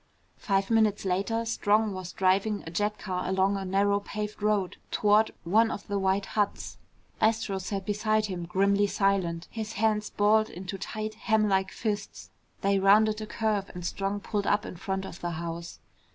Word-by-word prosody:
Five 195 +1 0
minutes 220 -3 +3
later, 200 +5 0
Strong 215 -1 +2
was 185 -1 -6
driving 195 +3 +1
a 165 - -7
jet 210 +4 -1
car 180 -2 -3
along 190 +1 +2
a 195 - -3
narrow 200 +2 +2
paved 210 +1 -5
road 205 -3 0
toward 210 +1 +3
one 220 +6 +3
of 205 - -5
the 200 -1 -2
white 195 +1 +1
huts. 205 -2 -2 0.4
Astro 220 -3 +1
sat 195 +1 -4
beside 215 +1 +1
him 180 -4 -5
grimly 200 +3 +2
silent, 190 -4 0
his 220 -1 -5
hands 210 0 +1
balled 215 +1 +3
into 190 +2 -7
tight 215 +2 -4
hamlike 205 -3 +3
fists. 210 -1 -4 0.3
They 195 0 +2
rounded 215 +2 +4
a 215 - -5
curve 210 -2 -1
and 175 -1 -6
Strong 195 +2 -2
pulled 205 0 -2
up 205 +1 +2
in - - -7
front 190 +2 -3
of 175 - -9
the 175 0 -2
house. 170 0 -6
200 Hz, 170 wpm, -28 LUFS, 190-215 Hz, 0.4 s, rounded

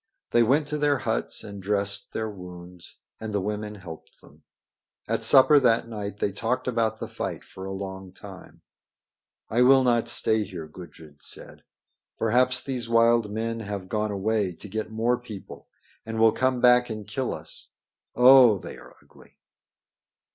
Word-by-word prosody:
They 120 - +4
went 140 +6 +2
to 150 - -2
their 145 -1 +2
huts 110 -3 -2
and 100 -1 -9
dressed 100 0 0
their 110 0 -3
wounds, 90 -3 -11 0.2
and 110 -1 -6
the 105 - 0
women 105 +2 -4
helped 90 -5 -12
them. - - -20 0.7
At - - -1
supper 145 +2 +7
that 115 -3 +2
night 105 -3 -6
they 100 - -1
talked 125 +6 -2
about 115 -3 0
the - - -5
fight - - -5
for 95 - -10
a 95 - -5
long 95 -1 -7
time. 95 0 -13 0.8
"I 120 - +1
will 130 +1 +6
not 120 -2 +2
stay 110 -2 +1
here," 90 -5 -8
Gudrid 75 -3 -14
said. - - -10 0.6
"Perhaps 125 +3 +2
these 125 -4 -4
wild 115 -1 +3
men 115 +1 -3
have 100 -3 -6
gone 105 0 -1
away 100 -2 -1
to 105 - -10
get 110 +2 -4
more 115 +3 0
people 110 -6 -11 0.4
and 115 0 -6
will 110 0 +6
come 130 0 0
back 125 0 +5
and 110 -2 -6
kill 125 +5 -3
us. - - -8 0.5
Oh! 125 -3 +7
they - - -9
are - - -16
ugly." - - -20
110 Hz, 165 wpm, -25 LUFS, 100-120 Hz, 0.8 s, supper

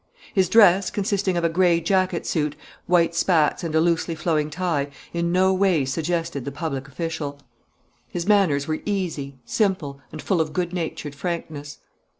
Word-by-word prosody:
His 190 -2 +2
dress, 195 -4 +6
consisting 195 -2 0
of 170 - 0
a - - +4
gray 170 0 +3
jacket 185 0 0
suit, 150 -2 -1 0.3
white 170 -1 +3
spats, 165 -2 +2
and 160 -2 -3
a - - +5
loosely 165 0 +1
flowing 155 -2 0
tie, 155 -3 -1 0.2
in 170 0 0
no 190 +1 +3
way 185 -7 +2
suggested 160 0 -2
the 140 - -5
public 140 -3 -4
official. 145 0 -4 0.7
His 170 -1 -4
manners 180 -10 +3
were 155 0 -2
easy, 165 -9 -3
simple, 175 -10 -1
and 155 - -8
full 180 +1 +1
of 155 -1 -3
good 175 +1 -1
natured 160 -4 -4
frankness. 145 -2 -5
170 Hz, 160 wpm, -23 LUFS, 150-185 Hz, 0.7 s, dress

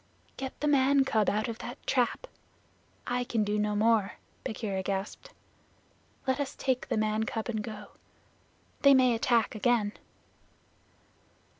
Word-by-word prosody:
"Get 265 -1 -6
the 300 - -1
man 275 -1 +4
cub 220 -5 +2
out 215 +1 0
of 230 -1 -5
that 245 +3 -7
trap; 250 - +1 0.8
I 245 0 -1
can 230 -3 0
do 210 0 -1
no 210 0 0
more," 215 -1 +2 0.3
Bagheera 205 -3 -3
gasped. 195 +1 -4 1.0
"Let 260 +1 0
us 280 -1 -3
take 260 -2 -1
the - - -1
man 215 0 +1
cub 220 0 -3
and 220 -2 -1
go. 210 -1 -8 0.9
They 280 -1 +7
may 255 -2 +5
attack 230 -1 +2
again." 215 -2 +1
230 Hz, 140 wpm, -29 LUFS, 210-260 Hz, 1.0 s, They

